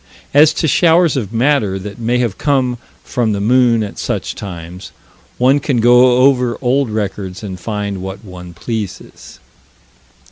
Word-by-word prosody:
As 150 +2 +6
to 160 - -1
showers 165 +2 +3
of 110 -7 -3
matter 115 -5 +1
that 100 +4 -8
may 120 +2 0
have 120 -6 -2
come 130 -4 0 0.2
from 115 -4 -1
the 100 - -2
moon 120 +1 +3
at 100 - -7
such - - -3
times 90 -2 -9 0.5
one 130 +3 +3
can 135 -3 -1
go 125 +2 +5
over 125 -3 +2
old 130 0 +1
records 100 -3 -4
and 95 -3 -6
find 100 -1 -4
what 95 +3 -7
one 90 -2 -11
pleases. 105 0 -7
115 Hz, 150 wpm, -16 LUFS, 100-130 Hz, 0.5 s, As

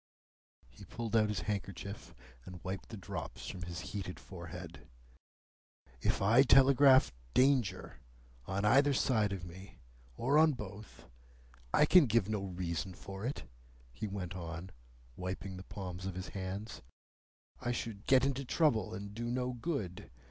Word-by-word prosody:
He - - -14
pulled 115 -1 -4
out 110 -1 +4
his 105 -5 -1
handkerchief, 100 0 -5 0.3
and 90 +2 -10
wiped 95 +1 -5
the 110 - -7
drops 95 - -6
from 90 - -6
his 85 +1 -5
heated 95 -3 -4
forehead. 85 -3 -9 1.1
"If - - +1
I 115 +6 +6
telegraph 135 - +6 0.2
Danger, 125 -8 +2 0.5
on 100 +2 -1
either 140 +5 +5
side 110 -6 +2
of 95 -3 -4
me, 95 +2 -11 0.4
or 140 +5 +3
on 160 -1 +6
both, 100 - -9 0.7
I 150 - +5
can 170 -2 +7
give 115 -3 +2
no 105 -2 -2
reason 90 0 -3
for 95 +5 -6
it," 140 - -4 0.5
he 105 - -4
went 95 -3 -5
on, 85 +1 -6 0.4
wiping 95 +1 -5
the 95 - -8
palms 95 -2 -6
of 95 - -4
his 95 0 -5
hands. 100 +3 -5 0.8
"I 120 -1 -1
should 110 -3 -5
get 130 0 +6
into 140 0 -1
trouble, 120 -6 +1
and 100 +1 -7
do 115 +2 -4
no 125 +1 -1
good. 115 - -4
100 Hz, 150 wpm, -34 LUFS, 90-120 Hz, 1.1 s, can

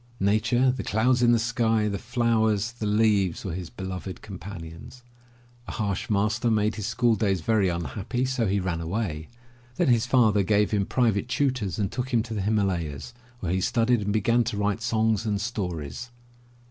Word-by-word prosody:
Nature, 115 +6 +2
the 125 -3 -4
clouds 120 +6 +2
in 120 -1 +5
the 120 - +5
sky, 115 -2 +1
the 100 -2 -2
flowers, 110 -3 +1
the 115 -3 -4
leaves, 105 -4 +2
were 95 - -3
his 90 -2 -5
beloved 95 0 -6
companions. 95 +3 -9 0.6
A - - -5
harsh 105 +3 -2
master 105 +3 +1
made 105 -1 +2
his 105 -3 -4
school 120 0 +2
days 100 -4 0
very 105 0 +2
unhappy, 90 - -2
so 130 -3 0
he 100 +1 +1
ran 90 -3 -2
away. 85 -3 -3 0.5
Then 175 -6 +2
his 120 -1 +3
father 115 -6 +4
gave 105 +1 +2
him 100 -2 0
pri 120 -3 +2
vate 105 +4 -3
tutors 130 -7 0
and 105 -1 -1
took 125 +2 -3
him 115 -3 +2
to 115 -1 -7
the 105 - -2
Himalayas 95 - -1 0.3
where 90 - -2
he 95 - 0
studied 120 +2 +2
and 100 0 -1
began 115 +3 +2
to 110 -3 -3
write 105 +2 0
songs 110 -2 +1
and 100 -2 0
stories. 95 - -4
105 Hz, 185 wpm, -26 LUFS, 95-115 Hz, 0.6 s, in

